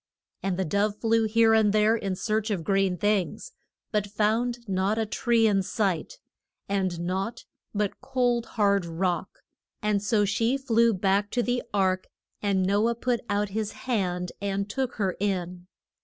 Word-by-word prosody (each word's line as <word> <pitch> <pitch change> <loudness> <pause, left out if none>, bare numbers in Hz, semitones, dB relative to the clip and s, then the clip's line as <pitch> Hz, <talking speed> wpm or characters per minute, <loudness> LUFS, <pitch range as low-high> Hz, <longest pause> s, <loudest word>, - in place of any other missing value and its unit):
And 190 -2 -1
the 190 - 0
dove 205 +4 0
flew 225 -1 +2
here 225 +1 +4
and 220 -2 +4
there 215 +1 +4
in 195 -4 -2
search 215 +2 -1
of 190 -6 -1
green 195 0 +1
things, 205 - 0 0.4
but 210 -2 0
found 225 +3 0
not 195 +2 0
a 225 - +1
tree 230 +1 +2
in 200 -3 +3
sight, 200 - -1 0.5
and 190 -3 -1
naught 190 +7 -3 0.3
but 205 -1 -1
cold 245 -2 0
hard 200 -2 +3
rock, 170 +1 -2 0.4
and 210 -1 0
so 205 0 +2
she 225 +6 +1
flew 235 -4 +3
back 195 +1 +1
to 245 +2 0
the 245 +1 0
ark 190 -2 +1 0.3
and 195 -2 +1
No 205 +4 +2
ah 235 - -1
put 240 0 0
out 205 0 0
his 210 +1 -3
hand 180 -7 -1
and 200 0 -1
took 260 +2 -2
her 195 -4 -1
in. 180 -3 -2
205 Hz, 165 wpm, -26 LUFS, 195-225 Hz, 0.5 s, here